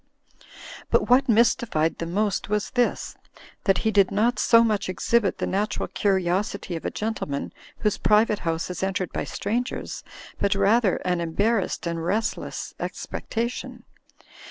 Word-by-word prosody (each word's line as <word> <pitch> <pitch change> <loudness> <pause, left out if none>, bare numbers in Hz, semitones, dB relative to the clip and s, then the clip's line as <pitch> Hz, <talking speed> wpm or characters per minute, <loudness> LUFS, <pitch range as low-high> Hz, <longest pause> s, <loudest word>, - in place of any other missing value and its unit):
But - - +2
what 260 +1 +5
mystified 220 -8 +2
them 165 0 -4
most 205 -1 0
was 210 0 -1
this, 245 -1 0 0.5
that 195 - +4
he 220 - +3
did 200 -3 +4
not 215 +3 +1
so 230 -1 +6
much 210 -4 0
exhibit 205 +2 +1
the - - -1
natural 205 +3 -1
curiosity 190 0 0
of 165 - -6
a - - +1
gentle 220 -6 -3
man 140 0 -4 0.2
whose 210 -2 0
private 210 0 +3
house 165 +1 -2
is 180 - -5
entered 190 -2 -2
by - - -2
strangers, 235 +5 -3 0.4
but 200 0 +2
rather 200 +1 +3
an 180 -1 +1
embarrassed 195 +5 0
and 170 -1 -2
restless 210 +6 -2
expectation. 235 +2 -4
205 Hz, 145 wpm, -25 LUFS, 185-225 Hz, 0.5 s, so